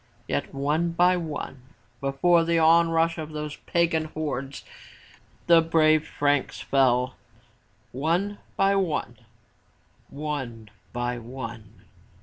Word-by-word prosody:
Yet, 70 Hz, -, -2 dB
one 150 Hz, +5 st, 0 dB
by 180 Hz, +2 st, +4 dB
one, 155 Hz, -6 st, -5 dB, 0.4 s
before 165 Hz, +5 st, +3 dB
the 170 Hz, 0 st, +1 dB
onrush 165 Hz, 0 st, +4 dB
of 155 Hz, 0 st, -6 dB
those 150 Hz, -1 st, -5 dB
pagan 165 Hz, -2 st, +1 dB
hordes 140 Hz, -4 st, -5 dB, 0.8 s
the 170 Hz, -1 st, +6 dB
brave 155 Hz, -1 st, +3 dB
Franks 145 Hz, -1 st, 0 dB
fell, 130 Hz, -1 st, +2 dB, 0.4 s
— 110 Hz, -2 st, -38 dB, 0.2 s
one 200 Hz, +4 st, 0 dB, 0.2 s
by 195 Hz, 0 st, +3 dB
one, 180 Hz, -7 st, -1 dB, 0.9 s
one 135 Hz, -7 st, -5 dB, 0.2 s
by 120 Hz, 0 st, -2 dB
one. 115 Hz, -3 st, -9 dB
150 Hz, 110 wpm, -25 LUFS, 135-165 Hz, 0.9 s, the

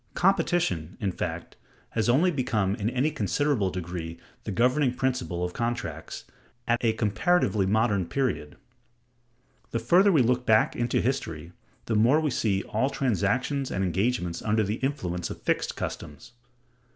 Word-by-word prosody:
Competition, 175 Hz, -, +1 dB
in 100 Hz, -4 st, -1 dB
fact, -, -, -5 dB, 0.3 s
has 115 Hz, +1 st, 0 dB
only 160 Hz, +9 st, +4 dB
become 120 Hz, -, 0 dB
in 105 Hz, +1 st, -1 dB
any 130 Hz, +5 st, 0 dB
considerable 145 Hz, -7 st, 0 dB
degree 85 Hz, -2 st, -5 dB, 0.3 s
the 110 Hz, -, -3 dB
governing 125 Hz, +5 st, +2 dB
principle 125 Hz, -10 st, -1 dB
of 90 Hz, 0 st, -3 dB
contracts, 85 Hz, -10 st, -4 dB, 0.4 s
at 120 Hz, +1 st, +1 dB
a 115 Hz, -1 st, +3 dB
comparatively 110 Hz, -, +1 dB
modern 105 Hz, -3 st, +1 dB
period. 125 Hz, -, -2 dB, 1.1 s
The -, -, -2 dB
further 175 Hz, -, +4 dB
we 150 Hz, -8 st, +4 dB
look 125 Hz, +1 st, +1 dB
back 110 Hz, -3 st, +3 dB
into 120 Hz, 0 st, 0 dB
history, 85 Hz, -, -3 dB, 0.3 s
the 115 Hz, -, -2 dB
more 115 Hz, +8 st, +4 dB
we 155 Hz, -2 st, 0 dB
see 100 Hz, -5 st, 0 dB
all 115 Hz, +6 st, 0 dB
transactions 135 Hz, -, 0 dB
and 95 Hz, -, -1 dB
engagements 95 Hz, -1 st, -1 dB
under 110 Hz, 0 st, +1 dB
the 105 Hz, +3 st, -2 dB
influence 90 Hz, -11 st, -2 dB
of -, -, -7 dB
fixed -, -, 0 dB
customs. 75 Hz, +11 st, -6 dB
115 Hz, 145 wpm, -27 LUFS, 95-130 Hz, 1.1 s, only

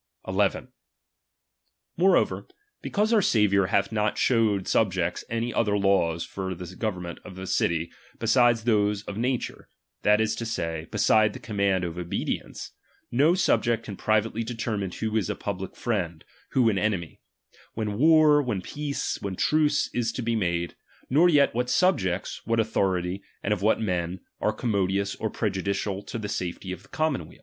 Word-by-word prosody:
1 -, -, -5 dB
1. -, -, +1 dB, 1.3 s
Moreover, -, -, +2 dB, 0.3 s
because 215 Hz, +3 st, 0 dB
our 220 Hz, -, +5 dB
Saviour 100 Hz, -, +3 dB
hath 100 Hz, +1 st, +1 dB
not 105 Hz, -1 st, +1 dB
i< -, -, -22 dB
showed 110 Hz, -6 st, +2 dB
subjects 95 Hz, -5 st, +1 dB
any 115 Hz, +1 st, -2 dB
other 105 Hz, -3 st, +1 dB
laws 95 Hz, -4 st, +2 dB
for 95 Hz, -1 st, -5 dB
the 90 Hz, +1 st, -9 dB
govern 105 Hz, -5 st, -2 dB
m 85 Hz, -, -4 dB
ment -, -, -12 dB
of 95 Hz, -, -11 dB
a 95 Hz, -, -6 dB
city, 85 Hz, -2 st, 0 dB, 0.3 s
beside 120 Hz, +1 st, +4 dB
those 105 Hz, -3 st, +1 dB
of 100 Hz, -, -6 dB
nature, 125 Hz, +3 st, -2 dB, 0.3 s
that 105 Hz, +1 st, +4 dB
is 110 Hz, -1 st, +1 dB
to -, -, -3 dB
^^^ -, -, -4 dB
say, 85 Hz, -6 st, -3 dB
beside 105 Hz, 0 st, +3 dB
the -, -, -8 dB
command 100 Hz, -3 st, 0 dB
of 85 Hz, 0 st, -4 dB
obedience; 85 Hz, -1 st, -4 dB, 0.4 s
no 145 Hz, +8 st, +4 dB
subject 120 Hz, -10 st, +2 dB
'^' -, -, -15 dB
can 100 Hz, -, -6 dB
privately 110 Hz, +3 st, 0 dB
determine 115 Hz, -4 st, -3 dB
who 110 Hz, +4 st, -3 dB
is 110 Hz, -4 st, 0 dB
a -, -, -1 dB
public 95 Hz, -2 st, -5 dB
friend, 85 Hz, -9 st, -2 dB, 0.3 s
who 125 Hz, -3 st, +4 dB
an 100 Hz, -3 st, +2 dB
enemy, 95 Hz, -6 st, -2 dB, 0.5 s
when 105 Hz, -1 st, -3 dB
war, 155 Hz, -1 st, +6 dB
when 120 Hz, -8 st, -2 dB
peace, 145 Hz, +4 st, -3 dB
when 100 Hz, -2 st, -4 dB
truce 150 Hz, +6 st, +2 dB
is 115 Hz, -2 st, 0 dB
to 125 Hz, -, -4 dB
be 115 Hz, 0 st, 0 dB
made, 85 Hz, -4 st, -1 dB, 0.4 s
nor 165 Hz, +6 st, +5 dB
yet 145 Hz, -4 st, +4 dB
what 125 Hz, +2 st, -1 dB
subjects, 100 Hz, -, +1 dB
what 115 Hz, +1 st, 0 dB
authority 95 Hz, -4 st, 0 dB, 0.2 s
and -, -, +1 dB
of 100 Hz, -, -4 dB
what 105 Hz, +2 st, +3 dB
men, 90 Hz, -4 st, -2 dB, 0.2 s
are 105 Hz, -, +1 dB
commodious 100 Hz, -3 st, 0 dB
or 110 Hz, -, -2 dB
prejudicial 100 Hz, -1 st, -2 dB
to 100 Hz, -, -6 dB
the 105 Hz, -2 st, -4 dB
safety 90 Hz, -1 st, -4 dB
of 95 Hz, -1 st, -6 dB
the 95 Hz, -, -21 dB
commonweal. 155 Hz, -, -2 dB
105 Hz, 175 wpm, -26 LUFS, 95-115 Hz, 1.3 s, war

